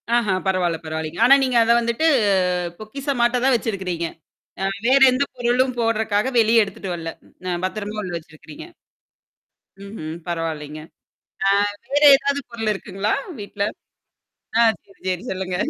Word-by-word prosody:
ஆஹா! 215 Hz, -5 st, +2 dB
பரவால்ல, 180 Hz, -3 st, +1 dB
பரவால்லேங்க. 160 Hz, +3 st, -5 dB
ஆனா 275 Hz, +3 st, +8 dB
நீங்க 255 Hz, -2 st, +1 dB
அத 230 Hz, +1 st, +3 dB
வந்துட்டு 235 Hz, +6 st, -1 dB, 0.7 s
பொக்கிஷமாட்ட 245 Hz, +1 st, -1 dB
தான் 270 Hz, -, +4 dB
வச்சிருக்கிறீங்க. 190 Hz, -8 st, -2 dB, 0.6 s
அ -, -, +1 dB, 0.2 s
வேற 270 Hz, +2 st, +5 dB
எந்த 255 Hz, +3 st, +1 dB
பொருளும் 250 Hz, +1 st, +1 dB
போடுறக்கா 220 Hz, +1 st, 0 dB
வெளியே 225 Hz, +1 st, +5 dB
எடுத்துட்டு 195 Hz, -2 st, -6 dB
வரல. 165 Hz, -1 st, -5 dB, 0.4 s
அ -, -, -1 dB
பத்திரமா 210 Hz, +2 st, -4 dB
உள்ள 185 Hz, -, -5 dB
வச்சிருக்கிறீங்க? 155 Hz, -1 st, -12 dB, 1.2 s
ம்ஹ்ம். 160 Hz, -6 st, -7 dB
பரவால்லங்க. 155 Hz, -3 st, -4 dB, 0.7 s
அ -, -, +5 dB, 0.4 s
வேறு 290 Hz, +1 st, +4 dB
ஏதாவது 280 Hz, +1 st, -1 dB
பொருள் 225 Hz, -2 st, -2 dB
இருக்குங்களா 195 Hz, +1 st, -3 dB, 0.3 s
வீட்ல? 200 Hz, 0 st, -5 dB, 1.0 s
ஆ -, -, +6 dB, 0.2 s
சரி, 195 Hz, -, -23 dB
சரி 185 Hz, +2 st, -2 dB
சொல்லுங்க. 185 Hz, -1 st, -3 dB
210 Hz, 130 wpm, -21 LUFS, 180-240 Hz, 1.2 s, ஆனா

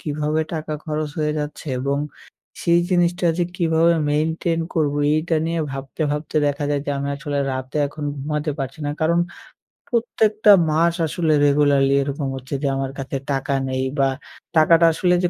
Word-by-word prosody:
কীভাবে 150 Hz, +1 st, -1 dB
টাকা 155 Hz, -1 st, -4 dB
খরচ 155 Hz, -1 st, -2 dB
হয়ে 150 Hz, -1 st, +1 dB
যাচ্ছে? 150 Hz, +1 st, -5 dB
এবং 140 Hz, +2 st, -1 dB, 0.6 s
সেই 170 Hz, 0 st, +4 dB
জিনিসটা 175 Hz, 0 st, +2 dB
যে 175 Hz, -, +2 dB
কীভাবে 165 Hz, -1 st, +3 dB, 0.2 s
মেইনটেইন 160 Hz, +2 st, 0 dB
করবো? 145 Hz, -3 st, +1 dB, 0.2 s
এইটা 160 Hz, +1 st, 0 dB
নিয়ে 165 Hz, 0 st, -1 dB
ভাবতে, 135 Hz, +3 st, -5 dB
ভাবতে 150 Hz, +1 st, -3 dB
দেখা 145 Hz, +1 st, -1 dB
যায় 145 Hz, -1 st, +1 dB
যে -, -, -1 dB
আমি 140 Hz, 0 st, -3 dB
আসলে 145 Hz, -1 st, -3 dB
রাতে 130 Hz, +2 st, -5 dB
এখন 150 Hz, +1 st, -7 dB
ঘুমাতে 150 Hz, +2 st, -2 dB
পারছি 135 Hz, +2 st, -5 dB
না। 145 Hz, -, -1 dB
কারণ 170 Hz, +2 st, +3 dB, 0.7 s
প্রত্যেকটা 220 Hz, -2 st, +3 dB, 0.2 s
মাস 165 Hz, +2 st, +3 dB
আসলে 160 Hz, 0 st, 0 dB
regularly 140 Hz, -1 st, +3 dB
এরকম 140 Hz, +1 st, -3 dB
হচ্ছে 130 Hz, +2 st, -5 dB
যে -, -, +2 dB
আমার 135 Hz, 0 st, -2 dB
কাছে 135 Hz, +1 st, -3 dB
টাকা 135 Hz, +1 st, -1 dB, 0.2 s
নেই 130 Hz, 0 st, -1 dB, 0.2 s
বা 135 Hz, -, +4 dB, 0.5 s
টাকাটা 165 Hz, +1 st, +6 dB
আসলে 180 Hz, +2 st, +2 dB
যে 175 Hz, -, +2 dB
150 Hz, 165 wpm, -21 LUFS, 140-165 Hz, 0.7 s, টাকাটা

